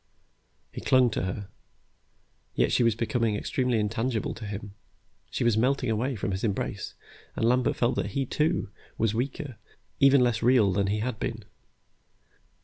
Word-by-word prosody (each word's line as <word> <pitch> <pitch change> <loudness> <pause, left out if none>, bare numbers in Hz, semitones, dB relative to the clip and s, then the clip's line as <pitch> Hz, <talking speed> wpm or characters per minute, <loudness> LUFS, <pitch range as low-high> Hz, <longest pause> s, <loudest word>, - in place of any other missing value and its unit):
He - - -7
clung 130 -2 +4
to 95 - -1
her, 95 +2 -5 1.1
yet - - +2
she - - +3
was 115 -2 +3
becoming 115 -2 0
extremely 125 +3 0
intangible 110 +2 -1
to 110 0 -8
him. 100 0 -6 0.6
She - - -2
was 120 -2 +3
melting 130 0 +1
away 125 +5 0
from 100 -1 -2
his 95 0 -3
embrace, 105 -4 -2 0.4
and - - 0
Lambert 125 +2 +2
felt 120 - +1
that 100 -1 0
he, 135 - +1
too, 150 - 0 0.3
was 110 -2 +1
weaker, 130 +1 -3 0.4
even 135 -1 +6
less 120 -2 +2
real 120 -4 +4
than 100 +1 +1
he 105 +2 0
had 115 -2 -3
been. 110 -3 -4
115 Hz, 160 wpm, -27 LUFS, 105-125 Hz, 1.1 s, even